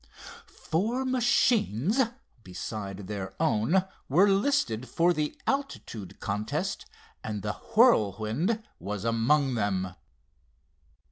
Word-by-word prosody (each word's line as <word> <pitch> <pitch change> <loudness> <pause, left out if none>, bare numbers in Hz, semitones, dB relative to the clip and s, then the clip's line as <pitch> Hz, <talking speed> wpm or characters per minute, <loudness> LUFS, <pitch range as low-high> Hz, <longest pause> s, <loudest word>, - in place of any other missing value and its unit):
Four 225 +11 -2
machines 235 - +2 0.4
besides 100 +1 -6
their 95 -2 -5
own 155 - +2 0.3
were 180 +9 +5
listed 195 - +1
for 175 +1 +3
the 150 -2 -2
altitude 270 - -3
contest 105 +2 -3 0.4
and 105 -2 -4
the 105 - -1 0.2
Whirlwind 150 - +3 0.2
was 100 +2 -4
among 125 +5 +2
them. 95 -5 -1
120 Hz, 90 wpm, -28 LUFS, -, 0.4 s, were